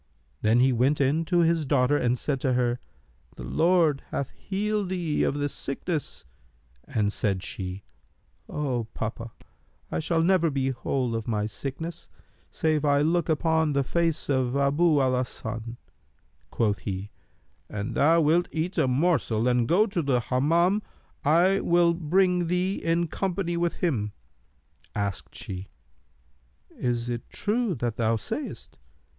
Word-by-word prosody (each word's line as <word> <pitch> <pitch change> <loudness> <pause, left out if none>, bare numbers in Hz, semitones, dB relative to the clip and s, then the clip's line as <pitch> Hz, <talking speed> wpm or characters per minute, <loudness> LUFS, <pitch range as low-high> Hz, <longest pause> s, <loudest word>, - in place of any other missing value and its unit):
Then 110 +3 +4
he 130 0 +4
went 130 +5 +2
in 145 +4 +2
to 175 +1 +2
his 165 -1 +2
daughter 140 -1 +2
and 125 -3 +1
said 135 +1 -2
to 130 -2 +1
her, 125 -1 +1 0.6
'The - - -8
Lord 165 -4 +2
hath 140 - -3
healed 205 0 -2
thee 175 -5 -1
of - - +1
this 145 -1 -2
sickness;' 150 +3 -3 0.6
and 105 -2 0
said 95 -3 -1
she, 95 +1 -5 0.7
'O 140 -5 -1
my 115 - -3
papa, 115 +1 -4 0.6
I - - -1
shall 165 +1 +1
never 175 -2 +3
be 135 -2 0
whole 125 -1 -2
of 115 0 -4
my 105 -2 0
sickness, 140 +9 -6 0.4
save 155 -2 0
I 145 -1 +3
look 170 +2 +1
upon 160 -1 +2
the 140 0 +2
face 165 +3 0
of 130 -2 +1
Abu 145 +3 +3
al 130 -1 +2
Hasan.' 115 -2 -4 0.7
Quoth 105 -3 0
he, 95 +2 -5 0.6
'An 100 0 -4
thou 165 +3 +4
wilt 165 +3 +3
eat 170 +3 -2
a 145 - +3
morsel 125 -5 +1
and 120 -2 +2
go 190 - +4
to 195 -5 -2
the 135 -4 +1
Hammam, 165 - +2 0.4
I 175 +6 +4
will 170 0 +3
bring 180 +2 +2
thee 180 +3 0
in 170 +1 +1
company 180 0 -2
with 170 0 0
him.' 110 - 0 0.8
Asked 100 -3 -3
she, 95 0 -6 1.0
'Is 120 -1 -2
it 120 -1 -4
true 215 -2 -1
that 120 -3 -3
thou 115 -1 +2
sayst?' 110 - -5
145 Hz, 150 wpm, -26 LUFS, 120-170 Hz, 1.0 s, Then